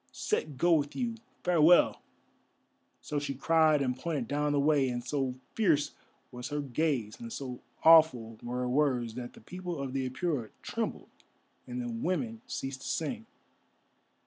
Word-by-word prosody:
Set 155 - -2
go 175 +5 +4
with 145 -3 +1
you. 240 -3 -1 0.3
Farewell!" 175 -1 +5 1.0
So 150 - -2
she 145 -1 -3
cried 155 0 +4
and 125 -1 0
pointed 155 +3 -3
down 150 +1 0
the 145 - +2
way, 140 -2 +3
and 120 -1 -4
so 135 -2 -1 0.2
fierce 165 -10 +2 0.4
was 125 +2 -6
her 145 0 -2
gaze, 135 -5 -1
and 115 -1 -7
so 125 -1 -6 0.2
awful 140 -9 +6
were 125 +1 -3
her 125 - -1
words, 125 -4 +1
that 120 0 -7
the - - -15
people 180 -3 -6
of 135 -2 -4
the 130 -1 -1
Apura 130 -3 -2
trembled - - -3 0.6
and 125 0 -4
the 120 - -3
women 185 - -2
ceased 135 - -4
to - - -7
sing. 225 +8 -2
145 Hz, 160 wpm, -30 LUFS, 125-160 Hz, 1.0 s, awful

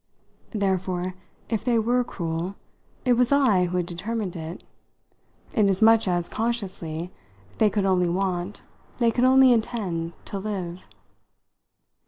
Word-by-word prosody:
Therefore, 185 -3 -1 0.3
if 225 -3 -2
they 240 -2 +2
were 240 +3 +2
cruel, 170 -2 -4 0.5
it 250 - +5
was 245 +1 +2
I 250 -10 +4
who 180 +1 -2
had 180 - 0
determined 190 +2 -4
it, 165 +1 -7 0.9
inasmuch 220 0 +4
as, 175 -1 +1
consciously, 185 -7 -3 0.5
they 215 - +5
could 205 -1 0
only 180 -2 +2
want, 185 +1 -2 0.3
they 235 -2 +3
could 245 +2 +2
only 260 0 +7
intend, 190 -8 -2
to 200 - -5
live. 185 -3 -5
195 Hz, 125 wpm, -25 LUFS, 180-230 Hz, 0.9 s, only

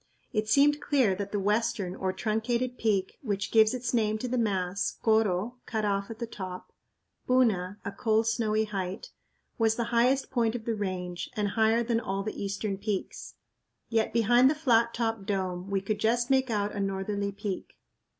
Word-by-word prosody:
It 215 -1 -1
seemed 290 +3 +4
clear 260 -9 +2
that 200 +1 -4
the 205 - -1
western 210 -2 0
or 190 -1 -1
truncated 235 +5 -1
peak, 200 -4 0
which 200 -6 -2
gives 220 +1 +5
its 250 -1 -3
name 215 -2 +2
to 250 - -4
the 250 - -1
mass 195 -5 -1
(koro 220 +1 +2
= - - -45
"cut 220 -2 -1
off 200 -1 -1
at 225 - -7
the 235 - -3
top"; 185 -5 -8 0.5
puna 205 -7 +2
= - - -34
"a 200 - -2
cold, 220 +1 +1
snowy 220 -1 +1
height"), 195 -2 -4 0.5
was 225 -1 +3
the 235 - -1
highest 250 +3 +3
point 235 -3 +1
of 225 -2 -5
the 230 - 0
range, 185 -4 -4
and 210 -1 0
higher 225 +2 +2
than 230 -1 +1
all 195 -3 -3
the 215 - -5
eastern 200 0 -3
peaks. 205 -2 -4 0.5
Yet 225 -1 +1
behind 240 +3 +5
the 305 - +1
flat 235 -6 +2
topped 225 -4 -2
dome 185 -2 -2
we 195 -1 0
could 205 +2 -2
just 240 +4 +1
make 265 -1 +3
out 205 -2 0
a 205 - -4
northerly 200 +1 -2
peak. 200 -1 -5
215 Hz, 190 wpm, -28 LUFS, 195-235 Hz, 0.5 s, gives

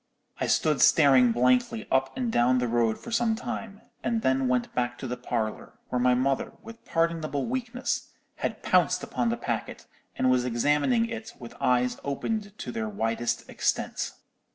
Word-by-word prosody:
"I - - 0
stood 150 -3 +2
staring 135 -5 +6
blankly 125 - +2
up 135 - +1
and 245 -3 -1
down 125 - +3
the 125 -1 0
road 115 -1 +1
for 235 - -10
some 230 -1 +2
time, 220 -2 -6 0.2
and 230 -1 0
then 130 0 +2
went 125 -1 0
back 120 0 -1
to 130 - -6
the 125 - -3
parlour, 120 -3 -3 0.2
where 125 - 0
my 125 0 +4
mother, 135 +2 0
with 225 +1 -11
pardonable 165 -4 0
weakness, 250 0 -2 0.3
had - - -3
pounced - - +3
upon 235 - -1
the 235 - -1
packet, 115 - -4 0.3
and 130 - +2
was 125 -1 +3
examining 145 - +2
it 225 -1 -6
with 120 -2 -10
eyes 125 0 +2
opened 205 +9 -3
to 125 - -5
their 110 -2 -3
widest 115 +3 -2
extent. - - -1
130 Hz, 170 wpm, -27 LUFS, -, 0.3 s, staring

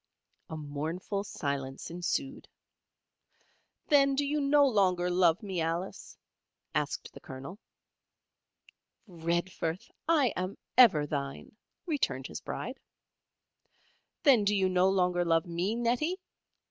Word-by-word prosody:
A 160 - -5
mournful 155 +7 -3
silence 140 -6 -4
ensued. 270 +11 -3 1.4
"Then 275 -2 +5
do 285 +1 +1
you 295 +1 0
no 285 +1 +5
longer 185 -6 +2
love 175 +1 +3
me, 190 -4 -2
Alice?" 165 +3 -4 0.6
asked - - -2
the - - -10
Colonel. 135 +9 -9 1.5
"Redforth! 170 0 -2 0.2
I 295 -7 +4
am 185 +2 -3 0.2
ever 210 -13 +7
thine," 140 +4 -5 0.3
returned 310 -6 -1
his - - -6
Bride. - - -5 1.4
"Then 265 -8 +6
do 205 +1 +2
you 190 -1 +2
no 185 +1 +3
longer 180 -2 +2
love 165 0 +2
me, 175 +5 -1
Nettie?" 245 +10 0
185 Hz, 110 wpm, -30 LUFS, 165-240 Hz, 1.5 s, ever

